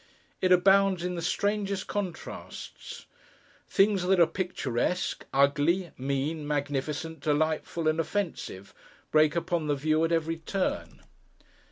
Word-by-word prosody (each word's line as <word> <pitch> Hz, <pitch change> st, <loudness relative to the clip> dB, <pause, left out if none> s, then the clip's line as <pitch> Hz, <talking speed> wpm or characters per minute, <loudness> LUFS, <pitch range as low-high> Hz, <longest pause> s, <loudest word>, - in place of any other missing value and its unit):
It 185 Hz, -, +2 dB
abounds 195 Hz, 0 st, +5 dB
in 180 Hz, 0 st, -2 dB
the 170 Hz, -, -4 dB
strangest 200 Hz, +1 st, -1 dB
contrasts; 205 Hz, -, -6 dB, 0.6 s
things 195 Hz, -1 st, +3 dB
that 190 Hz, -1 st, +4 dB
are 170 Hz, -, +8 dB
picturesque, 180 Hz, -3 st, -2 dB
ugly, 145 Hz, +6 st, +2 dB
mean, 140 Hz, +3 st, -2 dB
magnificent, 145 Hz, +2 st, -2 dB
delightful, 155 Hz, +2 st, 0 dB
and 155 Hz, +1 st, +2 dB
offensive, 165 Hz, -, -3 dB, 0.4 s
break 155 Hz, +1 st, +4 dB
upon 170 Hz, -2 st, -1 dB
the 145 Hz, -, +2 dB
view 155 Hz, +3 st, +1 dB
at 165 Hz, -, +1 dB
every 165 Hz, 0 st, 0 dB
turn. 185 Hz, +4 st, -3 dB
165 Hz, 120 wpm, -28 LUFS, 150-185 Hz, 0.6 s, are